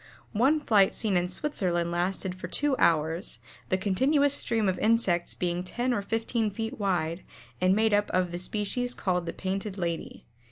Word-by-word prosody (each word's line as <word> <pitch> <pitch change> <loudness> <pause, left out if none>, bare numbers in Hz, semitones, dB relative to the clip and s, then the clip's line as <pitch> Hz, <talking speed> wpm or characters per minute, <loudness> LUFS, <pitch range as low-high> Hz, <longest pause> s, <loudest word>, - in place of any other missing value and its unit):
One 265 +8 +3
flight 210 -9 +3
seen 210 -4 0
in 175 0 +1
Switzerland 180 - -1
lasted 180 +2 -1
for 185 -2 -7
two 285 +8 +1
hours, 160 +1 +1 0.3
the 185 - +2
continuous 265 +10 +2
stream 225 -6 +1
of 185 -1 0
insects 210 -6 +1
being 175 0 -1
ten 245 +7 -1
or 215 - 0
fifteen 225 +1 -1
feet 225 +3 -5
wide 175 -4 -1 0.4
and 185 +1 +4
made 220 0 +2
up 205 0 +2
of 180 -1 0
the 175 - -4
species 215 +6 -1
called 180 -2 -1
the - - -1
Painted 195 +1 -4
Lady. 170 -3 -4
195 Hz, 170 wpm, -28 LUFS, 180-225 Hz, 0.4 s, and